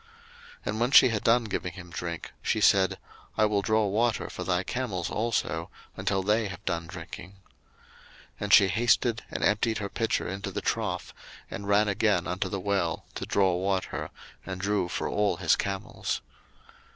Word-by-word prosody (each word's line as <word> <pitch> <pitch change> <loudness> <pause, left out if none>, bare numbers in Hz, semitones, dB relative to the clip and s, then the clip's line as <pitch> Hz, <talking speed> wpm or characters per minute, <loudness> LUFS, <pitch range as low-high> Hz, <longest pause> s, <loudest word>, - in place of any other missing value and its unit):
01:024:019 455 - -26 0.6
And 110 - -2
when 120 +1 +2
she 130 - +8
had 110 -3 -2
done 120 +1 +4
giving 90 -4 -3
him 90 -1 -11
drink, 85 +1 -5
she - - 0
said, 95 -2 +4 0.4
I 110 - +5
will 105 -1 +1
draw 110 +1 +2
water 110 +4 0
for - - -5
thy 90 0 0
camels 100 -8 -3
also, 115 +1 -1 0.3
until 95 -1 0
they 105 +2 +2
have 95 -3 -9
done 85 -2 -2
drinking. 90 +1 -9
01:024:020 - - -21 1.0
And 105 0 -3
she 100 - +8
hasted, 115 +1 +2
and - - -4
emptied 110 +2 +2
her 100 -2 -4
pitcher 115 +2 -1
into 100 +1 -4
the 95 - -3
trough, - - -2 0.4
and 100 - -6
ran 100 +1 +4
again 100 - +2
unto - - -2
the 100 - -3
well 95 -4 -1
to - - -5
draw 95 -2 +3
water, 95 +1 -2 0.3
and 95 -1 -6
drew 100 -1 0
for - - -2
all 105 -4 +1
his 85 -3 +3
camels. 100 -1 -3
100 Hz, 175 wpm, -28 LUFS, 95-110 Hz, 1.0 s, she